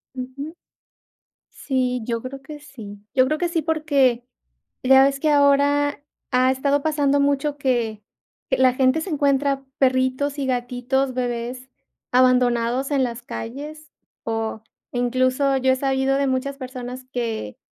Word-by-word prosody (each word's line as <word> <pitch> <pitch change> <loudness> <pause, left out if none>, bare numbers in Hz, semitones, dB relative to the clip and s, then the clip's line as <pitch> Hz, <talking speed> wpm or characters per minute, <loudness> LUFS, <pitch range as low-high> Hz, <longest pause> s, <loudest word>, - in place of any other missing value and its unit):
Ujú. 275 +5 -6 0.9
Sí, 250 -2 -1
yo 230 -1 -2
creo 265 +2 -7
que 295 +2 -10
sí 225 -9 -11
yo 255 -1 +4
creo 305 +4 0
que 350 +1 -1
sí, 335 -1 0
porque 285 -6 +1 0.6
ya 265 +1 +7
ves 275 0 0
que 305 0 +2
ahora 285 0 +3 0.3
ha 255 0 +4
estado 280 +2 0
pasando 290 -2 +2
mucho 285 +1 +1
que 235 -6 -1 0.5
que - - +1
la 260 -1 +4
gente 260 +4 +2
se 375 - -5
encuentra 280 -2 +1
perritos 260 +2 +1
y 275 - -1
gatitos 255 +1 -1
bebés 245 +1 -4 0.4
abandonados 250 +1 +3
en 275 -2 +2
las 240 -1 -3
calles. 290 +7 -7 0.3
O 225 -1 -3 0.3
incluso, 255 +3 +1
yo 260 0 +3
he - - -1
sabido 270 0 +1
de 280 0 +1
muchas 265 +1 -1
personas 255 -1 -7
que 225 - -3
260 Hz, 140 wpm, -22 LUFS, 250-280 Hz, 0.9 s, ya